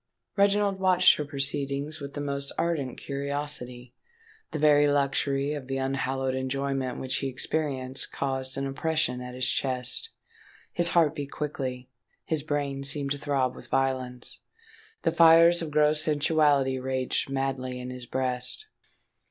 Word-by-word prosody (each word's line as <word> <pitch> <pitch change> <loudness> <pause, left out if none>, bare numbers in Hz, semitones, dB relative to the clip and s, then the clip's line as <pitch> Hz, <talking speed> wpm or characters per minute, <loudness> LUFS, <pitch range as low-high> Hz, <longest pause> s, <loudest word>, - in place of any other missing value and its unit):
Reginald 200 -1 +2
watched 185 -1 +5
her 150 - -3
proceedings 140 +1 -1
with 140 -1 -8
the 145 - -3
most 140 -1 -3
ardent 155 -7 -1
curiosity: 140 -3 -4 0.6
the - - -4
very 145 -1 +5
luxury 140 0 +1
of 145 -4 -6
the 135 0 -2
unhallowed 135 0 -1
enjoyment 130 0 -2
which 130 0 -1
he 135 - -2
experienced 135 -1 -2
caused 130 -1 -3
an 135 - -2
oppression 135 -2 -1
at 125 0 -7
his 130 -1 -1
chest; 130 - -1 0.6
his 175 -1 +4
heart 160 -3 +4
beat 145 -3 -5
quickly; 130 -4 -4 0.4
his 155 -2 0
brain 140 -2 -2
seemed 140 0 +2
to 145 - 0
throb 135 -3 0
with - - -12
violence. 130 -2 -2 0.6
The - - +2
fires 165 +1 +6
of 165 - -4
gross 150 0 +4
sensuality 145 -3 +2
raged 130 0 -1
madly 135 -2 -2
in 125 0 -6
his 125 -1 -8
breast. 130 - -3
140 Hz, 145 wpm, -27 LUFS, 130-150 Hz, 0.6 s, fires